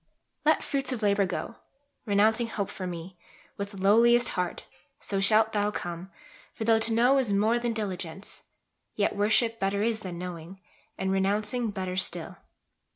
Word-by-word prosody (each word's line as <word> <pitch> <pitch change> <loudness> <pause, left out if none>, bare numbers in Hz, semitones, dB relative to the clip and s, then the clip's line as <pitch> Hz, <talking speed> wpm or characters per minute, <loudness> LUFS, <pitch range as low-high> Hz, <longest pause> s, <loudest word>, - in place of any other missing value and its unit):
Let 310 +1 +3
fruits 275 -1 -1
of 235 -4 -3
labour 200 -1 +3
go, 190 +5 -5 0.5
Renouncing 220 +3 +3
hope 205 -3 -3
for 185 - -5
Me, 175 +1 -7 0.4
with 200 0 -6
lowliest 235 +5 +5
heart, 180 -2 -3 0.3
So 195 - -2
shalt 215 +2 +4
thou 205 -1 +1
come; 175 -2 -5 0.5
for 225 - -4
tho' 225 0 +4
to 225 - +1
know 250 +4 +4
is 245 -6 0
more 215 +4 +2
Than 240 0 -1
diligence, 195 -4 -4 0.5
yet 205 -1 0
worship 225 +3 +2
better 200 +1 0
is 225 -1 0
Than 185 -4 -7
knowing, 180 +1 -7 0.4
and 190 0 -1
renouncing 210 +5 0
better 185 -3 -4
still. 185 - -1
205 Hz, 155 wpm, -28 LUFS, 190-225 Hz, 0.5 s, lowliest